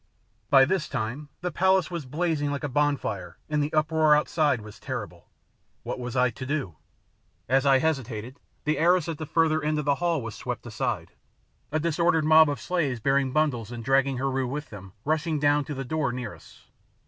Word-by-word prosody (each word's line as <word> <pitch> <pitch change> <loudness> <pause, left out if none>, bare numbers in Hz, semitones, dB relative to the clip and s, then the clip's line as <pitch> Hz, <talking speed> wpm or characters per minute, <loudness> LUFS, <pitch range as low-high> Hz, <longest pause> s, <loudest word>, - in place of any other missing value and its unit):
By 135 -1 +7
this 170 +1 -1
time 135 +3 -4
the 180 0 -2
palace 190 -1 +2
was 170 -6 -5
blazing 150 0 -1
like 140 +1 -3
a - - 0
bonfire 145 +1 -1
and 150 -1 0
the 145 +1 -1
uproar 155 0 +4
outside 150 -3 +1
was 105 -1 -12
terrible. - - -6 0.6
What - - -4
was 125 0 -5
I 125 -1 +3
to 130 - -8
do? 130 - -3 0.7
As 135 +2 +2
I 135 -1 +6
hesitated 130 -4 -2 0.2
the 155 +1 0
arras 175 0 +3
at 165 -3 -4
the 155 - -5
further 160 0 +2
end 155 0 0
of 150 - -2
the 140 +2 +1
hall 170 -6 +1
was 115 -2 -5
swept - - -5
aside, - - -3 0.6
a 155 - +1
disordered 165 0 +2
mob 155 0 +7
of 145 - -3
slaves 150 -9 -1
bearing 135 +2 +1
bundles 130 -6 0
and 115 -2 -7
dragging 135 0 +2
Heru 135 0 -1
with 145 +4 -5
them 100 -3 -10
rushing 155 +1 0
down 145 0 +2
to 145 - -5
the 135 0 -4
door 155 -1 -1
near 125 0 -5
us. - - -17
145 Hz, 195 wpm, -26 LUFS, 130-155 Hz, 0.7 s, By